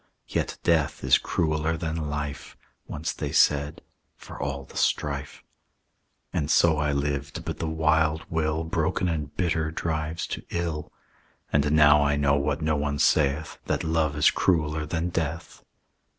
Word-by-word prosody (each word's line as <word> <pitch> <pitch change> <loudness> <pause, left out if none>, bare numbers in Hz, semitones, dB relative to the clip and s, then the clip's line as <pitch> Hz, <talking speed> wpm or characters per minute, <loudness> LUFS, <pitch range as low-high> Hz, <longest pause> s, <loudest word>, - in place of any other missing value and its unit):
"'Yet - - -2
death 80 -4 +1
is - - +5
crueller 80 0 0
than 80 -2 -3
life,' 75 -1 -5 0.3
Once 80 +3 -3
they - - -4
said, 75 +2 +2 0.3
'for - - -10
all 70 -1 -3
the - - -17
strife.' - - -1 0.9
"And 75 - -1
so 80 -3 +4
I 75 -1 +1
lived; 70 0 -2
but - - -4
the 80 - -2
wild 80 0 +1
will, 80 0 -1
Broken 80 +3 0
and 75 -4 -3
bitter, 80 -3 0
drives 80 0 -3
to - - -4
ill. 85 -3 -3 0.6
"And 75 0 +2
now 75 -1 +6
I 70 0 +2
know, 70 -1 +2
what 70 +2 -1
no 80 0 +1
one 70 0 -1
saith, 75 +1 +1
That - - -1
love 80 -2 0
is 75 - +5
crueller 75 -3 +1
than 85 +2 -1
death. 85 0 -4
75 Hz, 150 wpm, -26 LUFS, 75-80 Hz, 0.9 s, now